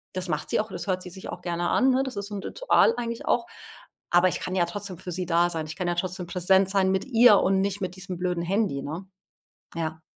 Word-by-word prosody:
das 185 0 -3
macht 155 -1 -2
sie - - +2
auch, 220 - -2
das - - -5
hört 185 -2 -1
sie 180 - -8
sich 190 +2 -9
auch 180 - -7
gerne 175 -1 -2
an, 265 - +4
ne, 260 +1 +3
das 265 -5 -5
ist 200 0 -3
so 205 - -7
’n 195 - -5
Ritual - - +3
eigentlich 235 -1 -4
auch, 235 -1 +1 0.6
aber 175 +1 +5
ich - - -3
kann 185 - -4
ja 175 -2 +3
trotzdem 190 +1 -5
für 185 - -6
sie 180 +1 -3
da 170 0 +3
sein. 160 -2 -3
Ich 160 - -7
kann 180 0 -3
ja 175 - 0
trotzdem 180 0 -3
präsent 190 +2 +3
sein 190 -1 +2
mit 190 0 0
ihr 240 -4 +6
und 190 0 +2
nicht 200 +1 -2
mit 185 -1 -3
diesem 185 -1 -6
blöden 180 -1 -1
Handy, 185 -6 0
ne? 165 +6 -6 0.7
Ja. 160 -1 -3
185 Hz, 260 wpm, -26 LUFS, 175-200 Hz, 0.7 s, ihr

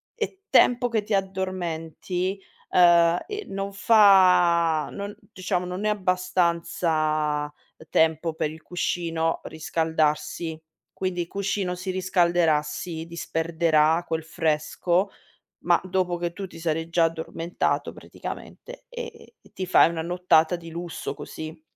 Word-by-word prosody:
e 400 -4 -4
tempo 245 0 +5
che 220 -3 0
ti 215 - -3
addormenti, 185 -1 -2 0.3
ehm, 170 -1 +5
e 420 0 -5
non 195 0 -4
fa 180 -7 +5
non 200 +1 -6 0.2
diciamo 180 -1 -2
non 180 +3 -4
è 215 - +3
abbastanza 170 -5 0 0.4
tempo 160 0 +2
per 155 -1 -2
il 160 0 -12
cuscino 165 -2 -1
riscaldarsi. 160 0 -1 0.4
Quindi 185 -2 -1
il 170 - -4
cuscino 195 -1 -2
si 185 +1 -4
riscalderà, 175 -4 +2
si 160 +2 -6
disperderà 165 -1 +1
quel 160 0 -2
fresco, 165 +4 0 0.5
ma 175 0 +4
dopo 185 -1 0
che 170 0 -2
tu 195 +1 -6
ti 180 - -13
sarai 165 0 -2
già 165 -1 +3
addormentato 165 +1 -2
praticamente - - -9
e 485 -1 -6
e 455 +1 -17
e - - -22
ti 185 - -4
fai 175 - +5
una 165 -1 -3
nottata 175 -1 +2
di 165 -1 -9
lusso 170 +1 -5
così. 155 +2 -8
175 Hz, 130 wpm, -25 LUFS, 160-185 Hz, 0.5 s, tempo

